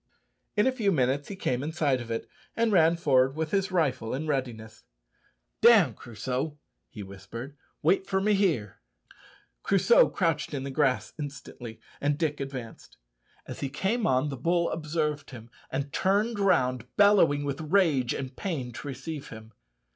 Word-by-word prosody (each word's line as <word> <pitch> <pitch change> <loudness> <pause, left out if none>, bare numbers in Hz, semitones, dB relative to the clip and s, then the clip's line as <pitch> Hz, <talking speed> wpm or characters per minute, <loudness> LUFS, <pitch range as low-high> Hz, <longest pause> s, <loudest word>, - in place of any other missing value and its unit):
In 210 - +4
a 260 - +4
few 225 -6 0
minutes 135 -2 +1
he 200 - -6
came 125 -9 -1
in 150 +3 -3
sight 140 -6 +1
of 120 - -9
it, 115 0 -3 0.3
and 230 -1 +2
ran 170 -3 +4
forward 135 -4 +3
with 160 -1 -3
his 195 -1 0
rifle 130 -10 0
in 150 +4 -4
readiness. 120 -7 -4 0.8
"Down, 215 - +6
Crusoe," 125 +7 -4 0.3
he 105 - -8
whispered; 100 +8 -9 0.3
"wait 190 +5 +2
for 190 -1 +1
me 210 +2 +2
here." 165 - 0 0.8
Crusoe 200 +4 +4
crouched 165 -4 -1
in 135 - -3
the 135 - -5
grass 135 -2 +1
instantly, 135 -5 -8 0.2
and 145 0 +1
Dick 155 -2 -1
advanced. 130 -4 -7 0.5
As - - -8
he 140 - -3
came 195 - -1
on, 130 +3 +2
the 135 - -5
bull 170 +5 +1
observed 150 -2 -2
him, 120 -2 -11 0.2
and 140 +1 -4
turned 205 +4 +1
round 130 - +2
bellowing 195 -8 +5
with 140 +2 -3
rage 155 -7 +2
and 130 -1 -6
pain 140 -10 -4
to 135 - -8
receive 145 +2 -6
him. 110 -1 -11
145 Hz, 160 wpm, -28 LUFS, 130-175 Hz, 0.8 s, Down